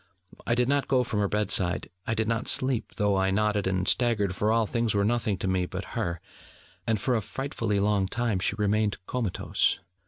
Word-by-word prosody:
I 120 - +3
did 125 0 +2
not 140 0 +1
go 130 -2 +3
from 115 -4 -2
her 100 - +2
bed 105 +1 -1
side: 90 -1 +1 0.2
I 110 - 0
did 110 0 0
not 115 +1 -1
sleep, 130 -3 +1
though 105 -2 +1
I 95 0 +2
nodded 105 0 +1
and 95 0 0
staggered: 110 -7 +2
for 105 +3 +1
all 115 0 +3
things 115 -1 0
were 100 0 +2
nothing 110 -3 +1
to 95 - -3
me, 95 -1 0
but - - -7
her: 85 -1 -2 0.7
and 110 -2 +2
for 125 +5 +1
a 115 - +1
frightfully 115 -3 -2
long 100 -1 +2
time 115 -1 -1
she 95 - 0
remained 105 0 +1
comatose. 115 -5 0
105 Hz, 210 wpm, -27 LUFS, 100-115 Hz, 0.7 s, I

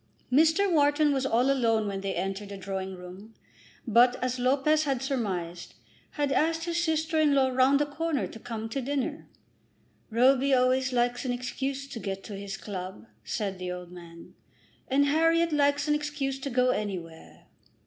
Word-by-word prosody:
Mr. 320 +8 +4
Wharton 295 -1 +3
was 265 -1 0
all 250 +3 +2
alone 225 -5 +2
when 195 -1 -3
they 195 -1 -3
entered 195 +3 -3
the 200 - -7
drawing 190 0 -5
room, 185 +5 -12 0.5
but, 245 +1 +5
as 255 0 -3
Lopez 280 +5 +2
had 270 -3 0
surmised, 185 -10 -3 0.4
had 290 -2 -1
asked 325 +3 +1
his 340 0 -1
sister 320 -1 0
in 295 -2 +4
law 265 -1 +3
round 260 +2 +3
the 295 - +2
corner 300 0 -2
to 225 - -10
come 225 -1 -5
to 270 +4 -3
dinner. 285 +4 -3 0.8
"Roby 260 +4 +4
always 255 +1 +2
likes 245 0 0
an 255 - -1
excuse 270 +3 -3
to 275 -4 -7
get 195 -2 -5
to 205 - -7
his 195 0 -6
club," 185 - -7 0.2
said 190 - -3
the 180 0 -4
old 180 -1 -7
man, 170 -1 -12 0.5
"and 280 +2 +3
Harriet 330 +3 +3
likes 285 0 +2
an 300 - +3
excuse 295 -2 -2
to 275 - -4
go 250 0 +2
anywhere." 180 -8 -6
255 Hz, 170 wpm, -28 LUFS, 200-285 Hz, 0.8 s, but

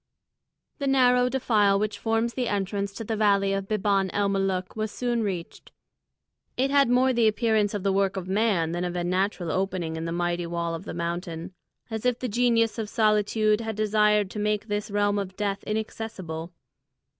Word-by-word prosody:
The 280 - -1
narrow 250 -2 +4
defile 215 -6 +2
which 210 0 -2
forms 225 +1 0
the 250 -1 -2
entrance 200 -1 -2
to 225 - -6
the 220 +1 -2
valley 200 -2 +3
of 195 0 -2
Biban 200 -2 +1
el 200 0 +1
Molûk 195 -2 -1
was 215 0 -2
soon 240 +1 -1
reached. 185 -5 -5 0.9
It 265 +2 +1
had 280 -3 +4
more 255 +1 +3
the 235 -2 +3
appearance 215 -1 +1
of 200 - -3
the 195 -1 +2
work 195 0 +1
of 185 -1 -4
man 190 -5 +1
than 175 +1 -2
of 180 0 -3
a 175 - -1
natural 180 -1 -1
opening 185 -3 -2
in 160 - -4
the 165 - -3
mighty 175 0 -1
wall 170 0 -2
of 165 - -6
the - - -6
mountain, 170 +1 -4 0.4
as 220 -1 -3
if 250 -1 +1
the 255 - -3
Genius 230 0 +2
of 215 -2 -3
Solitude 215 0 +2
had 220 -1 -4
desired 210 -1 +2
to 210 - -5
make 210 +1 -1
this 205 +1 -2
realm 205 0 +1
of 190 -1 -5
death 200 -1 -2
inaccessible. 200 -6 -4
205 Hz, 190 wpm, -26 LUFS, 190-225 Hz, 0.9 s, narrow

